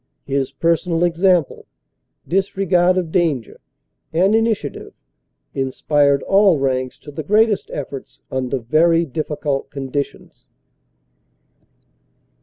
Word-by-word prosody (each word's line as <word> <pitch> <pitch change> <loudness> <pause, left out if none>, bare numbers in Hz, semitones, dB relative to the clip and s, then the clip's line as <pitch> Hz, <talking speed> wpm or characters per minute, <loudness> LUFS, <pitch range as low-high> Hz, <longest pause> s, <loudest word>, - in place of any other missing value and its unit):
His 135 -1 -1
personal 165 +3 0
example, 175 -1 +1 0.6
disregard 185 -1 +2
of 175 -3 -2
danger 160 -10 0 0.5
and 185 +6 +3
initiative 225 -9 -1 0.6
inspired 140 +1 +1
all 195 -4 +4
ranks 130 -2 -1
to 145 - -10
the 145 - -5
greatest 210 +5 +2
efforts 140 -1 -7
under 130 0 -1
very 165 +7 +2
difficult 145 -1 -3
conditions. 140 +1 -5
155 Hz, 90 wpm, -19 LUFS, 135-180 Hz, 0.6 s, all